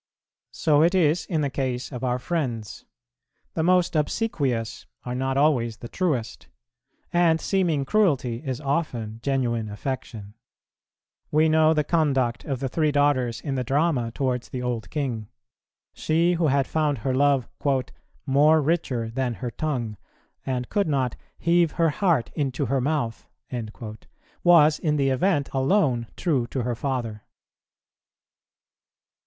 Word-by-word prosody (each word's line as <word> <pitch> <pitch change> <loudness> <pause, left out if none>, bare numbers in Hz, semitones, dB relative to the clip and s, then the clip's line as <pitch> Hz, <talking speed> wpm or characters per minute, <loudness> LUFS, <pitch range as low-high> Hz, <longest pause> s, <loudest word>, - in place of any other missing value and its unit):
So 150 -2 +2
it 170 +4 +4
is 165 -1 +2
in 160 -5 0
the 140 - 0
case 130 -1 -3
of 125 -1 -6
our 125 -1 +1
friends; 125 - -3 0.7
the 160 - -1
most 180 +1 +3
obsequious 145 - -1 0.2
are 125 - -3
not 130 +1 -1
always 125 -6 +2
the 120 - -8
truest, 145 -8 -2 0.7
and 170 -2 +4
seeming 170 -8 0
cruelty 135 - +1
is 130 -3 -3
often 135 -7 -2
genuine 120 -5 -1
affection. 105 -2 -5 1.0
We 155 +1 +3
know 160 0 +4
the 150 - +2
conduct 135 -8 +1
of 135 -3 -3
the 135 - 0
three 155 +3 +1
daughters 140 -5 +1
in 140 - -3
the 130 -1 -1
drama 135 -2 +1
towards 125 -1 -2
the 125 -1 -4
old 120 -3 -3
king. 125 -8 -3 0.7
She 165 +3 +1
who 170 -2 +1
had 140 -1 +2
found 150 -3 0
her 130 - +1
love 140 -1 +2 0.8
"more 150 +3 +5
richer 140 -7 0
than 125 -1 -1
her 125 0 -5
tongue," 120 -9 -3 0.5
and 125 -2 -2
could 200 -3 +1
not 135 -5 0 0.2
"heave 170 -2 +2
her 165 -2 +2
heart 170 - +1
into 140 -2 -1
her 135 0 0
mouth," 140 -5 -2 1.2
was 155 -4 +6
in 150 -2 0
the 140 -2 +2
event 145 +1 +1
alone 135 - +2
true 140 -9 0
to 130 -1 -3
her 120 +1 -1
father. 115 -4 -3
140 Hz, 140 wpm, -25 LUFS, 125-155 Hz, 1.2 s, was